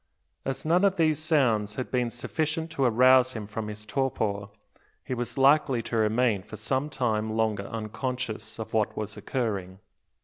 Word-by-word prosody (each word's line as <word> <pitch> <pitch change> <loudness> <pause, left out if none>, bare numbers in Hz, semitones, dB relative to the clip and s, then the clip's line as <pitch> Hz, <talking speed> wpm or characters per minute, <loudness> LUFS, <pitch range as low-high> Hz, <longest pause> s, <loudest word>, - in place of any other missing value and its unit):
As 135 +2 -3
none 175 +4 +3
of 195 -1 +4
these 155 -4 +2
sounds 120 -10 +2
had 130 - -4
been 125 -2 +1
sufficient 160 +6 -2
to 140 -4 0
arouse 130 +2 +5
him 110 -3 -5
from 105 +1 -5
his 105 0 -6
torpor, 105 -4 -1 0.6
he - - -4
was 120 0 -4
likely 135 -3 +4
to 115 - -4
remain 110 -1 +2
for 110 +3 -10
some 135 +6 -1
time 110 -5 -1
longer 105 -3 0
unconscious 110 0 -4
of 110 - -7
what 110 -2 +1
was 105 -1 -4
occurring. 100 -8 -3
120 Hz, 165 wpm, -27 LUFS, 110-135 Hz, 0.6 s, arouse